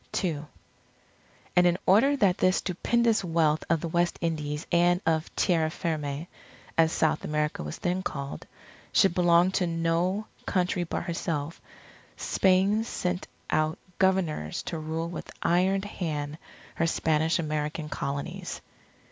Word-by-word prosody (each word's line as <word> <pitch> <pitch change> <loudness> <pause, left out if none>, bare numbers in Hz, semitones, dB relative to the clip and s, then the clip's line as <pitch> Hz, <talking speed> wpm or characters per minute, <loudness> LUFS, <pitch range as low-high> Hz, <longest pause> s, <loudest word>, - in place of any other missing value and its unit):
II 155 -5 -1 1.1
And 180 0 +6
in 175 0 +2
order 230 +10 +5
that 195 -7 +3
this 185 0 +3
stupendous 225 +4 +1
wealth 160 -3 +2
of 165 -1 +2
the 170 - -2
West 175 +1 +1
Indies 150 -2 -2
and 175 +1 +4
of 160 0 +1
Tierra 165 -3 +2
Firme, 155 -2 -3 0.5
as 160 -1 +4
South 160 - +1
America 150 0 -1
was 75 0 -5
then 180 +1 -1
called, 140 -6 -5 0.4
should 195 - +4
belong 175 0 +4
to 185 -1 +1
no 170 +5 0 0.2
country 180 -1 +1
but - - -3
herself, 165 -2 -3 0.6
Spain 195 +3 +3
sent 180 -5 -3 0.2
out 155 +2 +1 0.2
Governors 180 - +1
to 165 - -4
rule 160 +1 -3
with 175 - -7
iron 190 +3 +2
hand 155 -6 -4 0.4
her 165 - +2
Spanish 160 0 +1
American 150 -1 -2
Colonies. 140 -1 -4
170 Hz, 130 wpm, -27 LUFS, 155-185 Hz, 1.1 s, And